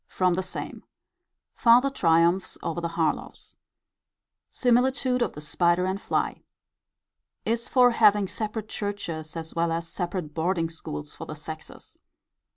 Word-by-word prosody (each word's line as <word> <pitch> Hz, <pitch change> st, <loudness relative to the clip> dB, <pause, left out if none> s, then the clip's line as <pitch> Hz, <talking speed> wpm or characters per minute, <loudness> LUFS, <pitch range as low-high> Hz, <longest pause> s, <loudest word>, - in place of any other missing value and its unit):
From 185 Hz, -1 st, +1 dB
the 185 Hz, -, 0 dB
same. 185 Hz, -, -6 dB, 0.7 s
Farther 250 Hz, +3 st, +5 dB
triumphs 170 Hz, -4 st, +2 dB
over 170 Hz, +1 st, -2 dB
the 170 Hz, -, -1 dB
Harlowes. 165 Hz, -2 st, -2 dB, 0.9 s
Similitude 250 Hz, +1 st, +2 dB
of -, -, 0 dB
the 150 Hz, -, -8 dB
spider 170 Hz, +4 st, +2 dB
and 190 Hz, +1 st, -2 dB
fly. -, -, -1 dB, 1.0 s
Is 230 Hz, +1 st, -1 dB
for 250 Hz, -2 st, +5 dB
having 210 Hz, -3 st, +4 dB
separate 215 Hz, +1 st, -4 dB
churches 170 Hz, -8 st, -5 dB
as 160 Hz, -1 st, -6 dB
well 170 Hz, 0 st, 0 dB
as 165 Hz, 0 st, -2 dB
separate 175 Hz, -2 st, -4 dB
boarding 165 Hz, 0 st, 0 dB
schools 75 Hz, -, -7 dB
for -, -, -9 dB
the -, -, -6 dB
sexes. -, -, -9 dB
185 Hz, 135 wpm, -26 LUFS, 165-225 Hz, 1.0 s, Farther